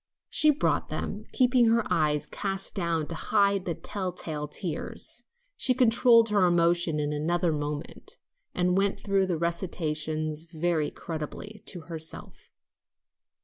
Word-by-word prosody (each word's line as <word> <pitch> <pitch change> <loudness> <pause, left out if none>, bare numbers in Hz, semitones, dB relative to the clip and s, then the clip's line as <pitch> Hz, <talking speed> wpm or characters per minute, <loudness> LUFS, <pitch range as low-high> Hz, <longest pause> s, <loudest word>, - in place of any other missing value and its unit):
She 305 - +6
brought 300 +1 +1
them, - - -5
keeping 250 -2 +4
her 230 0 +3
eyes 150 -2 +1
cast 195 -1 -3
down 170 -5 -1
to - - -4
hide 200 +1 +1
the 170 - -2
tell 190 +1 -3
tale 155 -4 -5
tears. 160 +1 -4 0.3
She 255 - +3
controlled 230 -1 +5
her 205 -2 +3
emotion 170 -2 +2
in 150 0 -1
another 170 +3 0
moment, 150 0 -5 0.4
and 180 0 +2
went 195 +1 +1
through 195 -2 +1
the 175 -3 -1
recitations 155 -2 -2
very 160 -2 0
creditably 170 +7 -7
to 175 - -2
herself. 160 -1 -6
175 Hz, 135 wpm, -27 LUFS, 155-200 Hz, 0.4 s, She